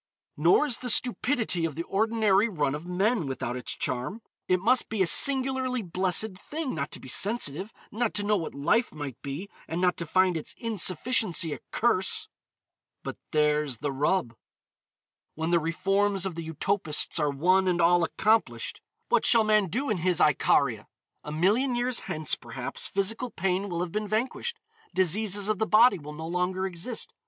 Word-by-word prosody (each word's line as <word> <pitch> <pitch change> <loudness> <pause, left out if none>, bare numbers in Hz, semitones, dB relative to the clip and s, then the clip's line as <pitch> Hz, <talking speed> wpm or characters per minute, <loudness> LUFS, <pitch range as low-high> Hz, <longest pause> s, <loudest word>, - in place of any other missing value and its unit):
Nor 170 - +3
is 255 -6 -1
the 250 - -3
stupidity 240 - +2
of 160 -4 -2
the 165 - -3
ordinary 215 +1 +1
run 145 -8 -1
of 150 +4 -7
men 190 - 0
without 125 -2 -4
its 125 - -5
charm. 130 - -4 0.2
It 185 0 +2
must 240 +6 +2
be 215 -4 +1
a - - +1
singularly 260 +3 +3
blessed 185 +3 0
thing 305 +3 -5
not 145 -2 -3
to - - -6
be - - -12
sensitive, 195 - +1 0.2
not 230 +1 -2
to 205 - -1
know 210 +1 +2
what 165 -7 -4
life 185 - +1
might 145 -5 -7
be, 145 +8 -6 0.2
and 165 - -4
not 180 0 +1
to 170 - -5
find 185 +1 +2
its 160 - -5
insufficiency 195 -5 +1
a - - -7
curse. 215 -5 +2 0.8
But - - -6
there's 150 -3 +1
the 145 +4 -3
rub. 135 -2 0 1.0
When 160 +2 -2
the 170 - +4
reforms 195 +4 0
of 190 - -3
the 165 -1 -7
utopists 165 -1 +1
are 150 -1 +1
one 185 +7 +2
and 175 -1 +1
all 175 +1 +4
accomplished, 220 +6 0 0.3
what - - +2
shall 230 -2 +5
man 215 -2 +2
do 255 - -3
in 210 - 0
his 180 0 0
Icaria? 135 -6 +2 0.4
A 150 - -7
million 210 - +1
years 245 0 -1
hence, 155 -5 -1
perhaps, - - -5
physical 225 +6 -1
pain 190 0 -2
will 170 -1 -3
have 175 -1 -4
been 215 +2 -3
vanquished. 255 - -2 0.4
Diseases 200 +2 +1
of 215 -2 -1
the 220 - 0
body 225 -1 +5
will 150 0 -9
no 160 +1 -7
longer 180 +2 -2
exist. 190 +6 -5
185 Hz, 175 wpm, -27 LUFS, 160-220 Hz, 1.0 s, shall